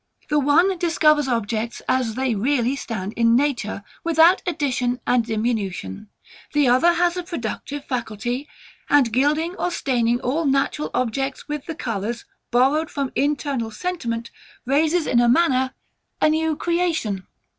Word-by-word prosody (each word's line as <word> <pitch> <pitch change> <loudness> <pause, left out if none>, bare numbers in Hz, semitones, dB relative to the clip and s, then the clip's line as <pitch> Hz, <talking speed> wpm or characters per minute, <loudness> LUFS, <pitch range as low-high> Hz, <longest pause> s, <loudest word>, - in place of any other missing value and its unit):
The 300 0 +3
one 330 +7 +3
discovers 305 -4 +3
objects 230 -1 -2
as 250 -4 0
they 260 -1 0
really 245 +4 +1
stand 215 -7 -5
in 230 0 +3
nature, 245 -7 0 0.2
without 335 +2 +5
addition 255 -7 -1
and 245 -1 +3
diminution: 215 - -3 0.4
the 295 -2 +3
other 320 +8 +5
has 345 +1 +1
a - - -1
productive 290 - -5
faculty, 245 +2 -3 0.4
and 265 -6 +4
gilding 300 +7 +1
or 360 - 0
staining 240 -7 0
all 300 +6 -1
natural 275 +2 0
objects 255 +2 -2
with 295 -2 -5
the 325 - -4
colours, 230 -2 -4 0.2
borrowed 275 +6 +2
from 275 -2 -3
internal 280 -4 -1
sentiment, 230 -4 -4 0.3
raises 310 +5 +2
in 240 - +2
a 240 0 +4
manner 260 -2 +2 0.4
a - - +4
new 315 0 +1
creation. 325 - -1
265 Hz, 140 wpm, -22 LUFS, 235-305 Hz, 0.4 s, without